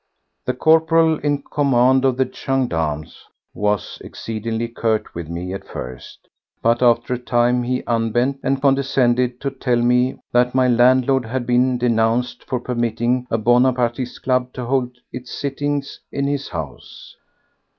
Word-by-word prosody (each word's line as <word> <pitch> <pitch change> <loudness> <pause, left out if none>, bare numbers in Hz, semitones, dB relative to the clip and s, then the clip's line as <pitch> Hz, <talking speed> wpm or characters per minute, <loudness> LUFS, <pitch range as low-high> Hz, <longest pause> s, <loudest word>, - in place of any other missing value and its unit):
The 125 - -1
corporal 160 +2 +3
in 145 -1 -1
command 130 -2 +2
of 130 -2 +2
the 130 - +2
gendarmes 80 - -2 0.3
was 105 -1 -2
exceedingly 115 +1 -4
curt 115 -2 -2
with 85 -2 -6
me 90 +2 -5
at 95 - -7
first, 60 0 -9 0.4
but 115 +1 +2
after 120 0 +3
a 125 - -3
time 120 0 +1
he 125 +1 -2
unbent 120 +4 0
and 135 0 0
condescended 130 -3 +2
to 140 - -2
tell 125 -2 -1
me 125 +2 +2
that 125 +1 +2
my 130 -1 +4
landlord 125 +1 +3
had 120 +2 -3
been 125 +1 +2
denounced 120 0 0
for 125 - -2
permitting 120 +1 -1
a 115 - +1
Bonapartiste 120 +1 +1
club 125 -1 0
to 125 - -5
hold 125 -1 -1 0.2
its 125 0 -7
sittings 145 0 -3
in 140 - -2
his 140 -1 -2
house. 80 -6 -8
125 Hz, 145 wpm, -20 LUFS, 115-130 Hz, 0.4 s, my